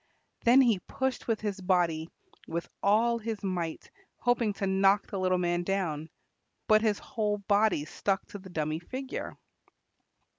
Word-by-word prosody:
Then 245 +3 +7
he 230 -7 +3
pushed 265 +6 -3
with 225 -2 0
his 205 -2 -3
body 175 -3 +1 0.4
with 170 +1 -3
all 230 +4 +3
his 220 -2 -4
might, 175 -4 -3 0.3
hoping 245 -3 +1
to 195 - -3
knock 195 +1 +3
the 195 - -5
little 185 0 +2
man 175 -1 0
down, 175 -5 -2 0.6
but 215 0 +6
his 215 -2 +2
whole 210 -2 -2
body 200 -5 +2
stuck 195 +4 -1
to 205 - -8
the 190 0 -12
dummy 155 -2 -2
figure. 260 +9 -6
195 Hz, 150 wpm, -29 LUFS, 175-220 Hz, 0.6 s, Then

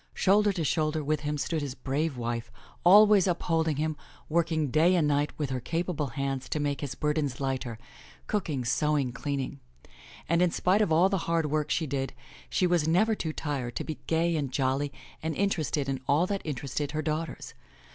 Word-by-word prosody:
Shoulder 205 +2 +4
to 175 -4 -2
shoulder 155 +1 0
with 155 +1 0
him 150 0 -2
stood 155 +2 -1
his 140 -3 -4
brave 140 +1 -2
wife, 120 0 -3 0.3
always 205 +1 +7
upholding 165 -3 +1
him, 155 +2 -1 0.3
working 160 -3 +1
day 165 +6 +4
and 160 -4 +3
night 145 0 +1
with 145 -3 -2
her 130 - -1
capable 165 +2 -2
hands 135 0 -3
to 155 - -1
make 145 -1 -1
his 140 -3 -4
burdens 150 -4 -1
lighter, 130 -4 -2 0.5
cooking, 155 - -2
sewing, 145 +1 +1
cleaning. 140 +1 -3 0.7
And 170 +1 +2
in 180 - +4
spite 185 +5 +2
of 205 - +1
all 170 +4 +5
the 195 -1 0
hard 165 -3 +1
work 150 -1 0
she 160 - +1
did, 135 -2 -3 0.4
she 185 - +1
was 175 -3 +2
never 200 +7 +3
too 165 -7 -3
tired 135 -7 -3
to - - -2
be 155 - -6
gay 165 +1 +2
and 140 -4 -2
jolly 135 +2 0 0.3
and 160 0 -2
interested 160 -8 0
in 135 -1 -2
all 150 +5 +3
that 200 +1 -2
interested 145 0 -3
her 155 0 -1
daughters. 155 +2 -3
150 Hz, 185 wpm, -28 LUFS, 140-170 Hz, 0.7 s, always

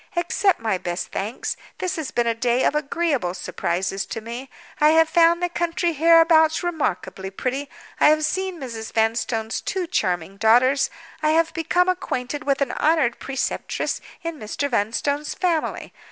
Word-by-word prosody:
Accept 350 +3 +1
my 220 -5 -1
best 175 0 -4
thanks. 215 +5 -3 0.2
This 370 0 -2
has 315 -5 -4
been 240 - 0
a 230 - +2
day 240 +2 +1
of - - +3
agreeable 290 - -1
surprises 190 +2 -2
to - - -5
me. 235 +4 -7 0.3
I 300 - +6
have 325 0 +6
found 340 +1 +4
the - - +3
country 345 0 -1
hereabouts 325 +1 +5
remarkably 195 - -2
pretty; 260 +8 -3 0.3
I - - +6
have 310 0 +3
seen 375 +2 -2
Mrs. 230 -5 -6
Vanstone's 225 0 0
two 385 -3 -2
charming 185 - -1
daughters; 245 +6 +4 0.3
I 305 - +2
have 330 0 +2
become 355 +2 +1
acquainted 295 -6 -2
with 275 -1 +1
an 270 -3 +1
honored 305 -7 +1
preceptress 270 -1 -2 0.2
in 335 -2 -5
Mr. 220 +6 -3
Vanstone's 265 +7 -1
family. 340 -4 -1
285 Hz, 155 wpm, -23 LUFS, 225-330 Hz, 0.3 s, I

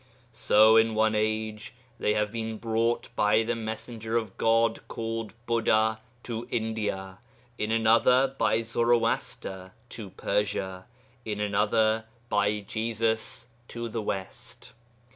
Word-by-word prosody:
So 110 0 +5
in 110 0 +4
one 110 0 +3
age 110 +1 -2 0.2
they 105 - +1
have 105 -1 0
been 110 -1 -4
brought 115 +1 0
by 105 +2 +3
the 120 +1 -1
messenger 110 0 -4
of 110 -4 -3
God 115 0 +2
called 115 -1 -4
Buddha 110 -2 +2 0.2
to 115 -1 -5
India, 105 -4 -3 0.4
in 105 - -1
another 115 +4 +4
by 115 -3 +2
Zoroaster 115 -5 0 0.2
to 105 -4 -8
Persia, 95 -1 -2 0.4
in 105 -2 -4
another 110 +2 +2 0.2
by 105 0 +1
Jesus 110 +2 -2 0.2
to 115 0 -5
the 115 0 -3
West. 95 -3 -6
110 Hz, 120 wpm, -27 LUFS, 105-115 Hz, 0.4 s, So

